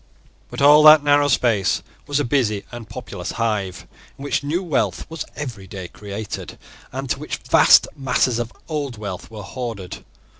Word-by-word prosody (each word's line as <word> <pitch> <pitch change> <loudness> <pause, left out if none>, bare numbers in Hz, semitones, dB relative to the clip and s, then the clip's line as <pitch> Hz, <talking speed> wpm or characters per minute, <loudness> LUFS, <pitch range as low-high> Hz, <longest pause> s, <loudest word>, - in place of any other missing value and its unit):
But - - -3
all 150 +1 +8
that 155 -1 +9
narrow 145 0 +4
space 115 -8 +1 0.2
was 145 0 0
a - - +1
busy 115 -6 0
and 120 -3 -9
populous 100 -8 -6
hive, 105 -5 -2 0.3
in 140 - -10
which 140 0 -1
new 165 +6 -1
wealth 160 -6 -1
was 165 - -5
every 120 -10 -6
day 95 -2 -8
created, 105 0 -7 0.3
and 135 -1 -2
in - - -10
which - - -4
vast - - +6
masses 125 -3 +1
of 120 0 -3 0.2
old 145 -7 -3
wealth 100 -4 -6
were 110 -2 -9
hoarded. 115 -8 -6
120 Hz, 165 wpm, -21 LUFS, 105-145 Hz, 0.3 s, that